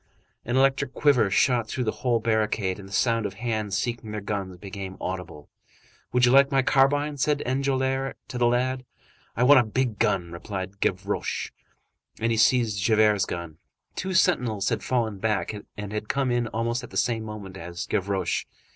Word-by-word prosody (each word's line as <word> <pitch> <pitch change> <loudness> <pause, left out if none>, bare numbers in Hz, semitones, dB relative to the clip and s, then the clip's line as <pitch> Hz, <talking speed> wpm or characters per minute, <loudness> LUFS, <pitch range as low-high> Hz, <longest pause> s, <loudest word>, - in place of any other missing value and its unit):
An 120 +3 0
electric 135 -1 +2
quiver 125 -8 +4
shot 120 +3 +2
through 125 - -2
the 110 - 0
whole 120 -2 +2
barricade, 110 -4 0
and 95 -1 -10
the - - -16
sound 115 +1 +1
of - - -10
hands 110 -4 -2
seeking 115 +2 -3
their 105 0 -4
guns 100 -3 -4
became 95 0 -7
audible. 90 -5 -6 0.6
"Would 125 0 +4
you 120 - +4
like 140 +1 +6
my 135 -1 +3
carbine?" 145 +2 +2
said 145 +1 +1
Enjolras 135 0 0
to 125 - -4
the 120 - +4
lad. 130 +2 0 0.5
"I 120 - +3
want 135 +2 +8
a - - +4
big 120 0 -1
gun," 85 -3 +1
replied 95 +2 -6
Gavroche. 95 +2 -2 0.7
And 115 +1 +1
he 115 - +1
seized 115 -4 +3
Javert's 105 0 +3
gun. 85 -3 -6 0.4
Two 185 0 -3
sentinels 120 - +2
had - - -1
fallen 115 -6 -1
back, 105 0 0 0.2
and 105 0 -6
had 105 0 -4
come 135 -2 +1
in 120 -1 +1
almost 115 +3 -2
at 125 - -9
the - - -6
same 115 -2 +1
moment 105 -3 -8
as 85 -1 -6
Gavroche. 95 -2 -1
110 Hz, 180 wpm, -26 LUFS, 100-130 Hz, 0.7 s, want